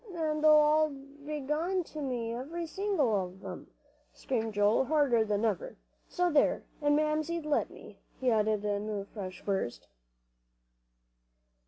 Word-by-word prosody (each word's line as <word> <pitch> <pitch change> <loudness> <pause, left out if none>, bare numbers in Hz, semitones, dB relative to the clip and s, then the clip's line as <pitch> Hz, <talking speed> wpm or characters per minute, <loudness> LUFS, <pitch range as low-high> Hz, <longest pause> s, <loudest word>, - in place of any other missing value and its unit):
"An' 310 -2 -1
they 310 - +5
all 305 0 +6
b'long 295 +5 -3
to 310 - -8
me, 240 -4 -2
every 315 +8 -4
single 385 -4 0
one 200 -3 +2
of 190 - -16
'em," 185 -2 -7 0.4
screamed 225 -4 -3
Joel, 205 +5 +3
harder 280 -6 +3
than 210 0 0
ever, - - -2 0.3
"so 360 -1 +1
there! 295 -2 +3 0.2
an' 290 0 +3
Mamsie'd 310 +2 0
let 300 -1 +1
me," - - -14 0.2
he 255 -2 +2
added 215 -1 +1
in 205 +1 -1
a 205 -2 -3
fresh 190 -3 -8
burst. 195 -12 -2
280 Hz, 145 wpm, -30 LUFS, 215-310 Hz, 0.4 s, all